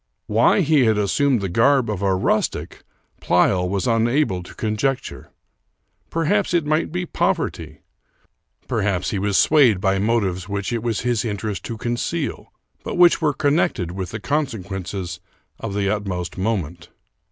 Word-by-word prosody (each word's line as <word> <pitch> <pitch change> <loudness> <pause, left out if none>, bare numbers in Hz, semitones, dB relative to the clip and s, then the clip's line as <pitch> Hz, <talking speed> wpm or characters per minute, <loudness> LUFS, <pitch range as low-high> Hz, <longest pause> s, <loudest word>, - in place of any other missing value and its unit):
Why - - +3
he 150 -4 +3
had 110 -2 +3
assumed 120 +4 +1
the 100 - -1
garb 120 +7 +3
of 105 -3 -3
a 95 -1 +2
rustic 95 - -1 0.4
Pleyel 90 +1 +2
was 100 +3 -1
unable 115 -3 +1
to 90 - -12
conjecture. 120 +5 -2 0.8
Perhaps 180 +4 +1
it 170 -3 +2
might 155 +2 0
be 180 +1 -2
poverty; 80 - -2 0.9
perhaps 95 -3 -1
he 100 - -1
was 100 0 +1
swayed 135 -10 +5
by 95 0 +1
motives 100 -3 0
which 100 +3 -3
it 115 - -1
was 115 -2 -1
his 120 -3 0
interest 105 -2 -4
to 115 - -5
conceal, 120 +8 -3 0.3
but - - -4
which 175 -1 +5
were 155 -2 +3
connected 145 - 0
with 95 +3 -5
consequences 95 - -3 0.4
of 100 - -5
the 100 -1 0
utmost 95 -4 -3
moment. 90 -5 -3
105 Hz, 145 wpm, -21 LUFS, 95-135 Hz, 0.9 s, swayed